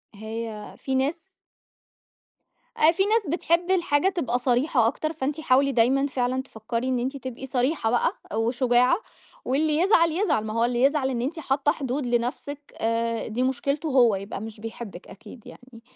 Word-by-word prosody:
هي 220 0 -6
في 265 -1 -3
ناس 275 +5 +1 1.6
أ 315 - +6
في 370 +3 +1
ناس 445 +3 +3
بتحب 340 +3 +1
الحاجة 350 -1 +2
تبقى 255 -10 -1
صريحة 245 -1 +2
أكتر، 310 +5 -2
فأنتِ 295 0 -3
حاولي 275 -1 +3
دايمًا 260 +3 +3
فعلًا 255 -1 -1
تفكّري 230 0 -4
إن 255 -1 0
أنتِ 265 +3 -3
تبقي 260 0 -7
صريحة 255 0 0
بقى 240 - +2 0.2
وشجاعة، 245 +5 +3 0.5
واللي 300 +3 +1
يزعل، 335 -2 +4
يزعل، 320 - +1
ما 215 - -4
هو 230 +1 +2
اللي 240 0 0
يزعل 275 -1 +2
إن 240 -2 -2
أنتِ 300 +7 -3
حاطّة 280 -1 +1
حدود 275 -3 -3
لنفسِك 245 +4 -3
آآ 230 0 -1
دي 230 +3 -1
مشكلته 275 +4 -1
هو، 245 -6 +4
يبقى 195 0 -6
مش 220 -1 -8
بيحبِك 225 -4 -8
أكيد 215 +4 -13
يعني. 245 -2 -14
260 Hz, 160 wpm, -25 LUFS, 235-295 Hz, 1.6 s, أ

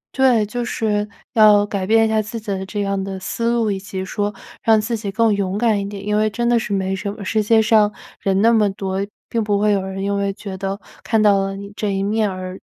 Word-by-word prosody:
对， 250 -5 +4
就 240 +3 -4
是 210 -3 -1 0.2
要 210 -2 +6
改 200 -2 -3
变 225 0 +5
一 - - +2
下 220 0 +2
自 215 +2 -6
己 215 -1 -6
的 190 -1 -2
这 205 +2 -3
样 195 -1 -1
的 195 0 -5
思 230 +5 -2
路， 230 -3 +1
以 195 - -2
及 190 -1 -5
说 205 +2 -2 0.3
让 220 -1 +4
自 230 +2 -2
己 205 -3 -4
更 225 0 +2
勇 200 0 -1
敢 220 -2 +2
一 200 - -4
点。 200 -1 -8
因 210 0 0
为 215 +1 +2
真 235 +3 -2
的 240 -1 +3
是 210 - -5
没 190 -1 0
什 200 +1 -4
么， 205 -1 -8
世 215 +3 +1
界 220 +2 +4
上 215 -1 +4 0.3
人 195 -1 +1
那 230 +1 +5
么 210 -3 +3
多， 195 0 -2 0.2
并 230 -1 -1
不 205 -1 +1
会 210 0 +3
有 195 -2 +2
人 190 0 -5
因 200 0 0
为 200 0 0
觉 195 -1 -7
得 195 +1 -4 0.2
看 225 -1 +1
到 205 -2 +5
了 195 0 -2
你 200 +1 -9
这 210 - -2
一 195 0 -1
面， 215 +1 +1
而 185 0 -6
205 Hz, 280 characters per minute, -20 LUFS, 195-220 Hz, 0.3 s, 要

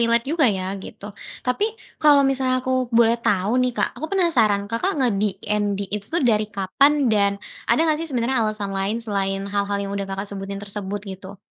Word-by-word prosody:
relate 235 0 +3
juga 315 -3 +3
ya, 190 -3 -1 0.2
gitu. 205 +1 -9 0.3
Tapi 250 +12 +1 0.3
kalau 290 -2 +6
misalnya 265 -1 +1
aku 260 - 0 0.2
boleh 230 0 +4
tahu 200 -2 +1
nih, 250 0 +1
Kak, - - +1
aku 315 - -2
penasaran 245 - +3
Kakak 300 +13 0
nge-DND 210 -4 0
itu 210 -1 -3
tuh 335 -1 0
dari 215 -3 +2
kapan 205 +8 +3 0.2
dan 200 -1 +3 0.4
ada - - +3
enggak 310 -2 +2
sih 330 - -3
sebenarnya 250 -2 0
alasan 215 -2 -2
lain 195 +3 -1
selain 195 -2 -1
hal-hal 200 0 -1
yang 200 0 -4
udah 200 -1 -3
Kakak 195 0 -3
sebutin 195 0 -5
tersebut, 205 0 -5
gitu? 190 0 -9
210 Hz, 180 wpm, -22 LUFS, 200-255 Hz, 0.4 s, kalau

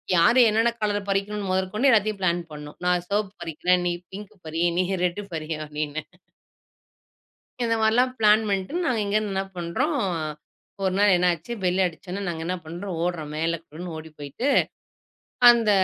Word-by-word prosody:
யாரு 200 +10 +5
என்னன்ன 225 +2 +3
கலர் 205 -1 -1
பறிக்கனும்னு 200 0 -1
முதற்கொண்டு 190 +8 +1
எல்லாத்தையும் 215 -2 +2
ப்ளான் 175 -1 +1
பண்ணோம். 150 0 -9
"நான் 180 0 +1
சிவப்பு 205 -1 -1
பறிக்கிறேன். 175 +3 +1
நீ 175 - +1 0.2
பிங்க் 205 +1 -8
பறி, 165 +2 -1
நீ 185 - +3 0.2
ரெட் 180 +4 -2
பறி" 155 -1 -5 0.2
அப்படின்னு 150 0 -4 1.6
இந்த 230 -1 +1
மாரிலாம் 245 +4 +3
ப்ளான் 215 0 +5
பண்ணிட்டு 200 - -1
நாங்க 240 -7 +1
இங்கருந்து 210 0 0
என்ன 195 0 0
பண்றோம் 175 - -1 0.9
ஒரு 190 -1 +1
நாள் 205 -1 +5
என்னாச்சு? 175 +3 0
பெல் 185 0 +1
அடிச்ச 170 +2 -6
உடனே, 200 +2 -3
நாங்க 165 -2 -3
என்ன 180 +1 -1
பண்றோம். 175 +2 -5
ஒடுறோம். 165 -4 -3
மேல 165 +2 0
குடுகுடுன்னு 165 +1 -8
ஓடிப் 155 -1 -11
போயிட்டு, 145 - -4 1.0
அந்த 230 -3 +3
185 Hz, 155 wpm, -25 LUFS, 170-210 Hz, 1.6 s, யாரு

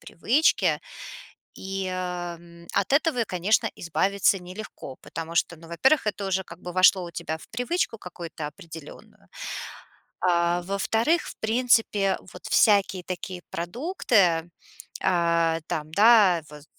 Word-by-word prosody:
привычки. 255 - +2 0.7
И, 195 0 -4
ам, 175 -2 -6
от 200 +2 0
этого, 280 -5 +2
конечно, 200 +5 +1
избавиться 195 +4 +1
нелегко, 180 -7 -9
потому 165 0 -7
что, 170 0 +1
ну, 165 - -15
во-первых, 260 - +2
это 205 -1 -2
уже 190 0 0
как 180 - -12
бы 180 - -7
вошло 185 +1 +5
у 170 - -7
тебя 160 -1 -4
в - - -15
привычку 245 +1 -2
какую-то 170 -4 -7
определенную. 160 0 -12 1.0
А, 175 -1 +2
во-вторых, 220 - +1
в - - -8
принципе 220 -4 +2 0.2
вот 180 - -13
всякие 200 -3 +3
такие 185 0 -6
продукты, 180 - +1 0.5
а-а, 170 -2 +2
там, 155 0 -4
да, 205 -4 +6
вот, 150 -1 -12
185 Hz, 125 wpm, -25 LUFS, 170-215 Hz, 1.0 s, да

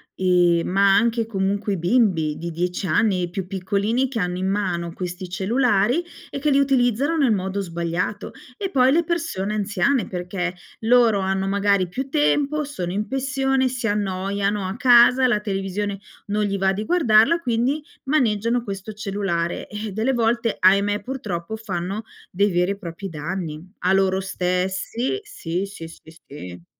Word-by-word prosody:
ehm, 175 -2 +3
ma 195 +1 +4
anche 230 0 +2
comunque 200 0 -1
i - - -1
bimbi, 175 -5 +2
di 170 +1 -5
10 180 +3 -2
anni 185 +1 +2
i 175 - -2
più 185 +1 -4
piccolini, 200 +7 0
che 245 -4 -4
hanno 180 -1 -1
in 190 +1 -1
mano 180 -4 -1
questi 180 +1 -5
cellulari, 225 - +1 0.3
e - - -5
che 295 +2 +1
li 275 - +4
utilizzano 270 +2 +2
nel 275 -7 +3
modo 190 +1 -2
sbagliato, 170 +3 -3 0.3
e 390 -2 -3
poi 255 0 +4
le 335 +4 +3
persone 310 - -2
anziane, 210 +5 +1
perché 180 0 -3 0.3
loro 230 -3 +4
hanno 190 0 -1
magari 200 -2 +2
più 265 +8 -4
tempo, 295 0 +1
sono 185 -12 -4
in 210 +3 -2
pensione, 270 0 0
si 245 -2 -2
annoiano 200 0 -1
a 190 - -4
casa, 250 +1 +6
la 240 -4 +2
televisione 195 0 -3 0.3
non 210 +1 0
gli 200 -1 -1
va 190 0 +2
di 210 +3 -3
guardarla, 300 -3 +4
quindi 255 +2 0 0.2
maneggiano 235 -4 +1
questo 200 0 -6
cellulare. 195 -5 -2
Eh, 210 0 -5
delle 220 +7 0
volte, 230 -1 +1
ahimè, 200 +2 +3
purtroppo 220 -7 -4
fanno 195 0 -4 0.3
dei 200 +3 +2
veri 180 +2 +1
e 200 - -4
propri 185 +1 -7
danni, 160 0 -5 0.2
a 185 +2 +2
loro 190 0 +2
stessi 190 - -2
Sì, 180 - -4
sì, 195 -5 -9
sì, 160 -1 -15 0.2
sì. 90 - -10
200 Hz, 160 wpm, -22 LUFS, 185-240 Hz, 0.3 s, casa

